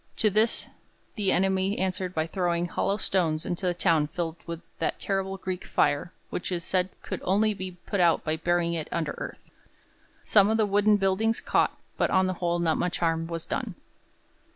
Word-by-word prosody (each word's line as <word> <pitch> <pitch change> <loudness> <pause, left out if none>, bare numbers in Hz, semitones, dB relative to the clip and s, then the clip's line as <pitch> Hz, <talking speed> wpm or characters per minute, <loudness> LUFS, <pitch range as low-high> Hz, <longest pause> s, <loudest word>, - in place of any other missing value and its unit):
To 215 -2 +3
this 215 +3 +2 0.5
the 205 -4 0
enemy 190 +1 +2
answered 185 -1 -2
by 160 0 +1
throwing 175 0 0
hollow 195 +3 0
stones 165 -6 0
into 180 +2 -2
the 175 - +1
town 165 -4 +3
filled 165 +1 -4
with 170 0 -5 0.2
that - - -1
terrible 195 -1 -1
Greek 185 -1 -4
fire 145 +4 +1 0.2
which 180 - -3
it - - +1
was 170 - -4
said 185 0 +1
could - - -4
only 210 +3 +2
be 185 -2 -6
put 200 - -2
out 170 -2 +4
by 155 0 -1
burying 175 +1 +1
it 160 -2 -3
under 160 -3 -1
earth. - - -8 0.7
Some 205 -1 +5
of 220 - +2
the 220 - +3
wooden 205 +1 +4
buildings 205 +3 +1
caught, - - +1 0.2
but - - +2
on 190 0 +3
the 185 - 0
whole, 175 0 +1
not 165 -2 +1
much 180 - 0
harm 165 -1 0
was 165 -1 -4
done. - - -3
185 Hz, 195 wpm, -27 LUFS, 170-195 Hz, 0.7 s, Some